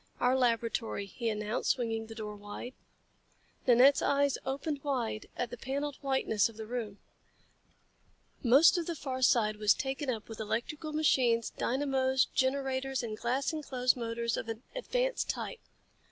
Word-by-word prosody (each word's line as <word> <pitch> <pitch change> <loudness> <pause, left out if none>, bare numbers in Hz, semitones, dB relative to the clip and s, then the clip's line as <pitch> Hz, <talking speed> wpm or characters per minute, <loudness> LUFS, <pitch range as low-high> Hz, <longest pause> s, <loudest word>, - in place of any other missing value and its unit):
"Our 250 +1 +3
laboratory," 230 -4 0
he 230 +4 -3
announced, 210 +1 -2
swinging 225 -4 -3
the 225 - -9
door 210 -2 -6
wide. 205 +5 -8 0.9
Nanette's 255 +3 +6
eyes 280 -1 +2
opened 280 +2 -3
wide 245 -7 -2
at 245 - -2
the 245 - -6
paneled 280 +3 -3
whiteness 265 -6 +1
of 225 - -14
the 220 - -6
room. 220 -3 -4 1.4
Most 280 +9 +6
of 335 - -4
the 340 - -2
far 265 -3 -4
side 215 -4 +3
was 210 -1 +4
taken 270 +1 -3
up 225 -4 -3
with 225 - -9
electrical 265 +8 -3
machines, 255 -7 +2
dynamos, 265 0 +1
generators 265 -1 0
and 220 -2 -4
glass 255 +7 -1
enclosed 255 -5 +1
motors 235 -1 -2
of 230 - -4
an 225 +2 -5
advanced - - -1
type. 485 - -3
250 Hz, 150 wpm, -31 LUFS, 225-275 Hz, 1.4 s, Nanette's